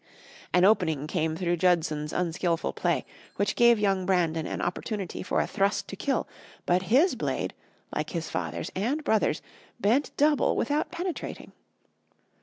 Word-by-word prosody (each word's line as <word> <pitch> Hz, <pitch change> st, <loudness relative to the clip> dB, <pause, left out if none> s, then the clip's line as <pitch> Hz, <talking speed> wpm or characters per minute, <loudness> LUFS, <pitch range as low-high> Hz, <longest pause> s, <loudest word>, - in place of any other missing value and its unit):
An 180 Hz, +1 st, +5 dB
opening 170 Hz, -9 st, +3 dB
came 160 Hz, -1 st, -1 dB
through 175 Hz, 0 st, 0 dB
Judson's 160 Hz, -4 st, +1 dB
unskilful 170 Hz, -1 st, -1 dB
play, -, -, 0 dB, 0.3 s
which 200 Hz, -1 st, 0 dB
gave 235 Hz, -1 st, +6 dB
young 195 Hz, -2 st, +1 dB
Brandon 165 Hz, -4 st, +1 dB
an -, -, -4 dB
opportunity 190 Hz, +1 st, -3 dB
for -, -, 0 dB
a -, -, +2 dB
thrust 200 Hz, 0 st, 0 dB
to -, -, -5 dB
kill, 270 Hz, +7 st, -1 dB, 0.4 s
but 180 Hz, +1 st, +3 dB
his 300 Hz, +10 st, +5 dB
blade, -, -, -2 dB, 0.4 s
like -, -, -2 dB
his 165 Hz, -3 st, -3 dB
father's 85 Hz, -1 st, -4 dB
and 255 Hz, +11 st, -1 dB
brother's, 220 Hz, -7 st, +1 dB, 0.4 s
bent 235 Hz, +7 st, +2 dB
double 295 Hz, -1 st, +3 dB
without 295 Hz, +5 st, 0 dB
penetrating. 350 Hz, 0 st, -5 dB
185 Hz, 145 wpm, -27 LUFS, 165-235 Hz, 0.4 s, gave